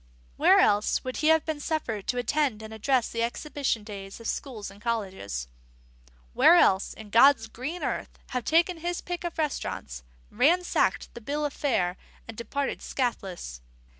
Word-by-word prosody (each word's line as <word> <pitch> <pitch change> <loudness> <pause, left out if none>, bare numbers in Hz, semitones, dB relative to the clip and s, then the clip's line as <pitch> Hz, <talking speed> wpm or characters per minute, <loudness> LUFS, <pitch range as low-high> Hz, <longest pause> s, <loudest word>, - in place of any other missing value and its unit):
Where - - +6
else 205 +1 +3
would 255 0 -4
he 305 - +1
have 320 0 +4
been 315 -2 -3
suffered 265 -10 -3
to 250 - 0
attend 245 -2 0
and 220 0 -8
address 245 +3 +1
the 230 - -3
exhibition 245 -1 -2
days 195 -1 -8
of 230 - -12
schools 220 -8 -4
and 200 +1 -16
colleges? 190 - -3 0.9
where 345 - +7
else, 195 - +3
in 215 -2 -11
God's 235 0 +6
green 260 +10 -6
earth, - - -3
have 250 -1 -2
taken 340 - +3
his 345 +2 -3
pick 350 0 -5
of 345 -1 -4
restaurants, 280 - -3 0.3
ransacked 335 +10 +2
the 235 - -9
bill 290 +6 -2
of 290 - -3
fare, 185 -10 0 0.3
and 225 - -8
departed 265 +5 -3
scathless? 190 - -3
245 Hz, 165 wpm, -27 LUFS, 210-300 Hz, 0.9 s, where